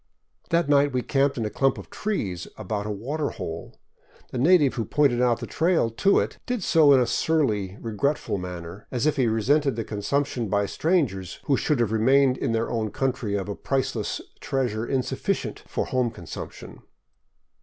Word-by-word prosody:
That 170 Hz, -2 st, +2 dB
night 145 Hz, -1 st, +4 dB
we 125 Hz, -1 st, 0 dB
camped 140 Hz, 0 st, +1 dB
in 115 Hz, -, -1 dB
a 105 Hz, -, -3 dB
clump 135 Hz, 0 st, +1 dB
of -, -, -10 dB
trees 100 Hz, -, -3 dB
about 105 Hz, 0 st, -3 dB
a -, -, -3 dB
water 135 Hz, +9 st, -2 dB
hole. 80 Hz, 0 st, -7 dB, 0.5 s
The 125 Hz, -, -3 dB
native 150 Hz, -1 st, +5 dB
who 115 Hz, -, -2 dB
pointed 130 Hz, +1 st, +2 dB
out 120 Hz, -2 st, +3 dB
the -, -, -3 dB
trail 165 Hz, -8 st, +1 dB
to 195 Hz, -, +3 dB
it -, -, -3 dB
did 250 Hz, -5 st, -2 dB
so 155 Hz, -4 st, +5 dB
in 135 Hz, -, +6 dB
a 125 Hz, -, +3 dB
surly, 110 Hz, -8 st, 0 dB
regretful 115 Hz, -2 st, -1 dB
man 90 Hz, -1 st, -6 dB
ner, 85 Hz, +5 st, -10 dB
as 125 Hz, +1 st, -1 dB
if 155 Hz, -1 st, +2 dB
he 130 Hz, -3 st, +3 dB
resented 135 Hz, +6 st, +2 dB
the 115 Hz, -, -2 dB
consumption 120 Hz, +3 st, -2 dB
by 100 Hz, 0 st, +2 dB
strangers 120 Hz, -, 0 dB
who 140 Hz, -, +2 dB
should 150 Hz, 0 st, 0 dB
have 115 Hz, -3 st, +1 dB
remained 130 Hz, +4 st, +4 dB
in -, -, 0 dB
their 115 Hz, 0 st, -1 dB
own 110 Hz, -2 st, -1 dB
country 125 Hz, -4 st, -1 dB
of 100 Hz, -1 st, -2 dB
a 100 Hz, -, -3 dB
priceless 130 Hz, -3 st, -2 dB, 0.2 s
treasure 120 Hz, -4 st, -1 dB
insufficient 130 Hz, -2 st, -2 dB
for -, -, -2 dB
home 125 Hz, -2 st, 0 dB
consumption. 115 Hz, -, -9 dB
125 Hz, 185 wpm, -25 LUFS, 105-140 Hz, 0.5 s, in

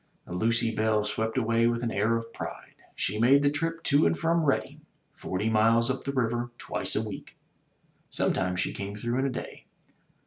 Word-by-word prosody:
The -, -, -8 dB
Lucy 115 Hz, +4 st, +1 dB
Belle 110 Hz, -1 st, +1 dB
swept 110 Hz, +3 st, -2 dB
away 115 Hz, -1 st, +2 dB
with 120 Hz, 0 st, 0 dB
an 115 Hz, -, -1 dB
air 110 Hz, +3 st, +1 dB
of 115 Hz, 0 st, -7 dB
pride. -, -, -7 dB, 0.2 s
She 105 Hz, +3 st, -2 dB
made 135 Hz, +5 st, +5 dB
the 140 Hz, -, +3 dB
trip 165 Hz, +2 st, -2 dB
to 145 Hz, +2 st, +4 dB
and 170 Hz, -, 0 dB
from 165 Hz, 0 st, +1 dB
Redding, 140 Hz, -, -1 dB, 0.3 s
forty 95 Hz, +4 st, -3 dB
miles 115 Hz, +2 st, +3 dB
up 130 Hz, 0 st, -5 dB
the 140 Hz, -, -1 dB
river, 120 Hz, -2 st, -1 dB
twice -, -, -2 dB
a -, -, 0 dB
week. -, -, -9 dB, 0.7 s
Sometimes 90 Hz, -1 st, 0 dB
she -, -, 0 dB
came 100 Hz, +1 st, -5 dB
through 120 Hz, +4 st, -2 dB
in 135 Hz, -, +1 dB
a -, -, -1 dB
day. 125 Hz, -, -7 dB
115 Hz, 195 wpm, -28 LUFS, 110-135 Hz, 0.7 s, made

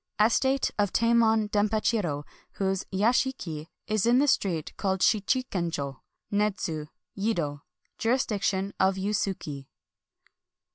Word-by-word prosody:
— -, -, -45 dB
Estate 265 Hz, +5 st, +3 dB
of 205 Hz, -2 st, +2 dB
Tamon 225 Hz, -2 st, +3 dB
DempacMro, 210 Hz, -7 st, +1 dB, 0.3 s
whose 195 Hz, -1 st, -1 dB
yashiki 200 Hz, -, 0 dB, 0.2 s
is 215 Hz, 0 st, +1 dB
in 240 Hz, +1 st, +5 dB
the 285 Hz, +2 st, +4 dB
street 175 Hz, -, 0 dB
called 190 Hz, -2 st, -1 dB
SMchikenclio, 180 Hz, -, 0 dB, 0.3 s
Nedzu, 190 Hz, -7 st, -1 dB, 0.3 s
Yedo. 170 Hz, -9 st, -1 dB, 0.2 s
— -, -, -46 dB
Jurisdiction 205 Hz, -5 st, 0 dB
of 190 Hz, 0 st, +3 dB
Yusiiki. 190 Hz, -8 st, -2 dB
200 Hz, 105 wpm, -27 LUFS, 175-225 Hz, 0.3 s, in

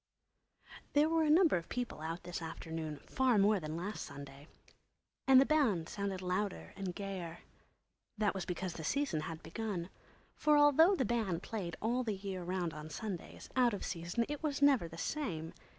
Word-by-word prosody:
There 295 Hz, +1 st, +5 dB
were 325 Hz, 0 st, +2 dB
a -, -, +2 dB
number 325 Hz, -, +6 dB
of 170 Hz, -, -6 dB
people 245 Hz, -10 st, -3 dB
out 165 Hz, +2 st, -4 dB
this 175 Hz, 0 st, -5 dB
afternoon, 160 Hz, -2 st, -5 dB
far 260 Hz, -4 st, +2 dB
more 205 Hz, +1 st, +4 dB
than 155 Hz, -1 st, -4 dB
last 200 Hz, +5 st, -4 dB
Sunday. 140 Hz, +1 st, -10 dB, 0.8 s
And 265 Hz, -1 st, +9 dB
the 270 Hz, -, +6 dB
band 245 Hz, -, +2 dB
sounded 195 Hz, -2 st, -3 dB
louder 185 Hz, +2 st, -2 dB
and 190 Hz, -2 st, -4 dB
gayer. 185 Hz, -4 st, -5 dB, 0.8 s
That 210 Hz, -1 st, +2 dB
was 190 Hz, -2 st, -3 dB
because 180 Hz, 0 st, -3 dB
the 160 Hz, -, -7 dB
Season 275 Hz, -, 0 dB
had 160 Hz, +1 st, -6 dB
begun. 195 Hz, -3 st, -4 dB, 0.4 s
For 300 Hz, -1 st, +4 dB
although 295 Hz, +6 st, +6 dB
the 265 Hz, -, +1 dB
band 200 Hz, -7 st, 0 dB
played 195 Hz, -7 st, -4 dB
all 240 Hz, +3 st, +1 dB
the 220 Hz, -4 st, -1 dB
year 190 Hz, -1 st, -5 dB
round 175 Hz, -1 st, -2 dB
on 155 Hz, 0 st, -7 dB
Sundays, 195 Hz, 0 st, -6 dB
out 245 Hz, -4 st, +4 dB
of -, -, -5 dB
season 175 Hz, +6 st, -1 dB
it 295 Hz, 0 st, -4 dB
was 295 Hz, -3 st, -1 dB
never 275 Hz, -10 st, +5 dB
the 165 Hz, 0 st, -10 dB
same. 165 Hz, -, -3 dB
195 Hz, 180 wpm, -34 LUFS, 170-250 Hz, 0.8 s, And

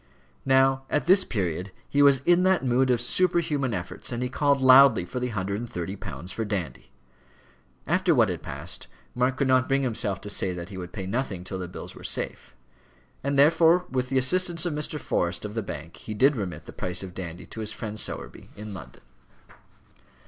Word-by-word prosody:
Now, 135 Hz, 0 st, +4 dB
at 150 Hz, -, 0 dB
this 190 Hz, +3 st, +5 dB
period, 90 Hz, -, -3 dB, 0.2 s
he 145 Hz, -, +1 dB
was 140 Hz, -2 st, +5 dB
in 175 Hz, 0 st, +5 dB
that 185 Hz, -6 st, +2 dB
mood 130 Hz, +1 st, +2 dB
of 125 Hz, -2 st, +3 dB
superhuman 150 Hz, -1 st, +1 dB
efforts, 90 Hz, +3 st, -5 dB
and 120 Hz, +1 st, -2 dB
he 125 Hz, -, -2 dB
called 140 Hz, +1 st, +2 dB
loudly 130 Hz, -6 st, +7 dB
for 125 Hz, -, -5 dB
the 125 Hz, -, -1 dB
hundred 100 Hz, -3 st, -3 dB
and 120 Hz, 0 st, -6 dB
thirty 90 Hz, +3 st, -4 dB
pounds 85 Hz, -1 st, -6 dB
for 115 Hz, -, -3 dB
Dandy. 100 Hz, -6 st, -4 dB, 1.0 s
After 180 Hz, +1 st, +2 dB
what 115 Hz, -5 st, +4 dB
had 90 Hz, -3 st, -4 dB
passed, -, -, -5 dB, 0.3 s
Mark 125 Hz, +1 st, 0 dB
could 140 Hz, -, +1 dB
not 130 Hz, 0 st, +3 dB
bring 135 Hz, 0 st, +1 dB
himself 110 Hz, -6 st, -1 dB
to 105 Hz, -, -6 dB
say 95 Hz, -2 st, +1 dB
that 85 Hz, +1 st, -7 dB
he 95 Hz, -, -8 dB
would 90 Hz, -1 st, -7 dB
pay 95 Hz, -, -6 dB
nothing 100 Hz, -3 st, -3 dB
till 95 Hz, +1 st, -6 dB
the 90 Hz, -, -4 dB
bills 90 Hz, -, -9 dB
were -, -, -13 dB
safe; 60 Hz, -, -4 dB, 0.7 s
and 140 Hz, +1 st, -1 dB
therefore 165 Hz, +4 st, +5 dB
with 130 Hz, -1 st, -1 dB
the 135 Hz, -, 0 dB
assistance 175 Hz, +5 st, +2 dB
of 175 Hz, -, -1 dB
Mr. 150 Hz, 0 st, -2 dB
Forrest 85 Hz, -6 st, -1 dB
of 105 Hz, -, -6 dB
the 115 Hz, -, -2 dB
Bank, 80 Hz, -4 st, -8 dB
he 110 Hz, -, -7 dB
did 135 Hz, +6 st, +4 dB
remit 95 Hz, -6 st, -5 dB
the -, -, -10 dB
price 90 Hz, +1 st, -3 dB
of 95 Hz, -2 st, -8 dB
Dandy 85 Hz, -2 st, -7 dB
to -, -, -10 dB
his 110 Hz, -1 st, -3 dB
friend 110 Hz, -1 st, -6 dB
Sowerby -, -, -3 dB
in 105 Hz, 0 st, -8 dB
London. 95 Hz, -, -11 dB
120 Hz, 205 wpm, -26 LUFS, 95-140 Hz, 1.0 s, loudly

